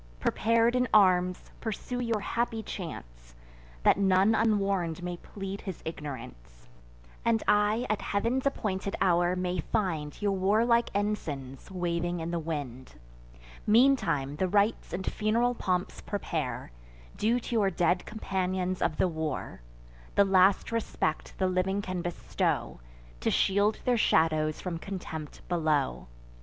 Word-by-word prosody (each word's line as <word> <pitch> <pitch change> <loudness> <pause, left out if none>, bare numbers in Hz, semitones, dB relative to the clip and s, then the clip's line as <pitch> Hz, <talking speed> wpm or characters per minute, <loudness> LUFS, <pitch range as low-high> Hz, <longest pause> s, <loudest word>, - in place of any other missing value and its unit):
Prepar'd 230 - +2
in 250 0 +2
arms, 180 -3 +3
pursue 240 +2 -4
your 230 -3 -1
happy 230 +1 -1
chance; - - -8 0.5
That - - +5
none 195 +2 +4
unwarn'd 195 -6 +1
may 175 0 -3
plead 195 +2 -7
his 190 -4 -6
ignorance, 115 - -8 0.6
And 230 -1 +2
I, 210 +3 +3
at 215 - -1
Heav'n's 235 +7 0
appointed 200 -7 -2
hour, 175 -1 +3
may 180 0 -2
find 160 -5 -2
Your 205 -1 +1
warlike 220 +5 +3
ensigns 145 -11 -3
waving 175 -1 -2
in 165 +1 -3
the 170 - -1
wind. 140 - -5 0.7
Meantime 210 - +3
the 185 - +1
rites 205 +4 +1
and 190 +2 -4
fun'ral 230 +3 +1
pomps 180 -5 -2
prepare, 200 - -3 0.4
Due 230 +3 +2
to 245 - -6
your 210 -4 +3
dead 175 0 +1
companions 185 -3 -2
of 155 - 0
the - - +3
war: 160 - -4 0.5
The 200 - +6
last 190 +2 +4
respect 225 -8 -2
the 190 - +1
living 185 +2 +1
can 185 -2 -3
bestow, 175 0 -2 0.4
To - - 0
shield 205 +2 +2
their 245 -1 +3
shadows 155 -6 +2
from 175 -3 -4
contempt 165 -5 -7
below. 155 - 0
185 Hz, 130 wpm, -29 LUFS, 165-210 Hz, 0.7 s, The